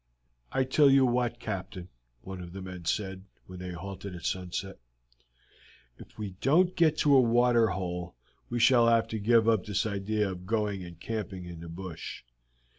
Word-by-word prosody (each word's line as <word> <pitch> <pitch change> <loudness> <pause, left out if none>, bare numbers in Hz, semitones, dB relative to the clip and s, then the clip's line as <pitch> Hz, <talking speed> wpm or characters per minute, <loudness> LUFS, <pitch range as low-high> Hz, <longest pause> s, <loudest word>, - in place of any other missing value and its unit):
"I 130 - +2
tell 140 +2 +4
you 135 -1 +6
what, 120 -1 0
Captain," 95 -4 -5 0.3
one 95 +3 -7
of 85 0 -9
the 95 - -7
men 90 -2 -8
said 95 +2 -2 0.2
when 90 -1 -10
they 90 0 -6
halted 95 +2 -7
at 85 - -9
sunset, 95 +1 -3 1.2
"if - - -14
we 105 -3 -4
don't 175 +7 +3
get 160 -2 +3
to 145 -1 +6
a 130 - +8
water 120 -1 +4
hole 90 -3 -4 0.3
we 120 - -2
shall 120 0 +5
have 115 -1 +4
to 110 - -3
give 115 +1 +4
up 110 -4 +2
this 105 0 0
idea 105 0 -1
of 90 0 -9
going 105 -3 -1
and 85 -2 -11
camping 100 -4 -5
in 85 -1 -8
the 85 0 -9
bush. 85 -4 -7
100 Hz, 180 wpm, -29 LUFS, 90-115 Hz, 1.2 s, a